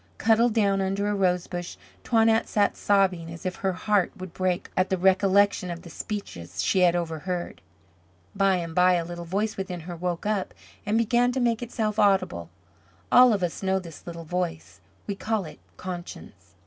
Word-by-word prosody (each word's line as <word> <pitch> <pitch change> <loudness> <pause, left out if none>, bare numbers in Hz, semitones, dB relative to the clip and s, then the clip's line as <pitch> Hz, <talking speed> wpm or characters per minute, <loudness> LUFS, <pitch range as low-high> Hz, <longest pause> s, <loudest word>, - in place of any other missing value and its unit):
Cuddled 225 +1 +3
down 200 -3 +2
under 195 +2 -1
a - - 0
rosebush, 180 -2 -1 0.3
Toinette 225 -1 +3
sat 205 -1 +1
sobbing 185 -5 +1
as 165 +1 -10
if 185 - -3
her 190 -1 -1
heart 195 +1 +1
would 185 -2 -8
break 185 -1 -1
at 185 0 +1
the 190 - +1
recollection 190 +1 +3
of 170 0 -6
the 170 - -11
speeches 200 - -5
she 190 - +2
had 175 -1 +4
overheard. 175 +1 -3 0.7
By 195 -1 +3
and 170 -2 -4
by 180 +1 +5
a 170 -2 0
little 175 0 -7
voice 205 +5 -2
within 185 -3 -4
her 175 +2 -7
woke 175 +1 -3
up 210 -3 -1 0.3
and 215 +2 +2
began 240 +2 +2
to 265 - -1
make 235 -2 +1
itself 220 -3 -2
audible. 190 - +2 0.6
All 250 0 +8
of 200 -4 0
us 175 - -2
know 190 0 +1
this 170 -4 -9
little 170 -1 -7
voice. 175 -1 -4 0.2
We 205 - -2
call 215 -1 -2
it 155 - -11 0.2
conscience. 180 -1 -9
190 Hz, 180 wpm, -26 LUFS, 175-205 Hz, 0.7 s, All